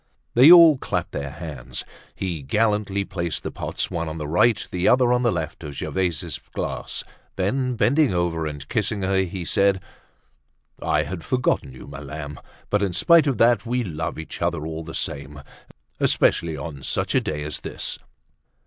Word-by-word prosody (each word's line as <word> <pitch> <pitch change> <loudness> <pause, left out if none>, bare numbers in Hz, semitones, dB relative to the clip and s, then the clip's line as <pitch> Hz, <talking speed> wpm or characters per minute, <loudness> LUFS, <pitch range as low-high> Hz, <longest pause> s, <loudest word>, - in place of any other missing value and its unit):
They 130 +7 +8
all 165 -5 +9
clapped - - -2
their 70 -1 -4
hands. 75 -4 -7 0.3
He 90 -5 -3
gallantly 105 +4 0
placed 85 -3 -3
the - - -4
pots, - - -4
one 85 -2 -2
on 80 - -6
the 75 -2 -4
right, 105 +8 +3
the 90 0 0
other 125 -1 +5
on 125 - +2
the 120 -2 +3
left 80 -2 -4
of 75 -2 -7
Gervaise's 90 0 -2 0.2
glass; - - -3 0.3
then 125 +7 0
bending 140 +5 +3
over 85 -3 0
and 75 -2 -7
kissing 105 +1 -1
her, 95 0 +1
he 95 -1 -1
said: 100 +2 +3 1.0
"I - - +1
had 90 -3 -6
forgotten 125 - 0
you, 65 - -11
my 70 0 -9
lamb. 75 +1 -7 0.3
But 105 - +2
in 100 -3 0
spite 165 - +5
of 135 -5 +1
that, 115 -1 +4
we 125 +1 -1
love 80 -5 -4
each 80 - -7
other 85 -3 -1
all 80 0 -5
the 80 0 -8
same, 70 0 -4 0.6
especially 80 -2 +2
on 70 -1 -7
such - - -2
a - - +4
day 75 -1 -3
as 75 -1 -4
this." - - -3
90 Hz, 175 wpm, -23 LUFS, 75-110 Hz, 1.0 s, all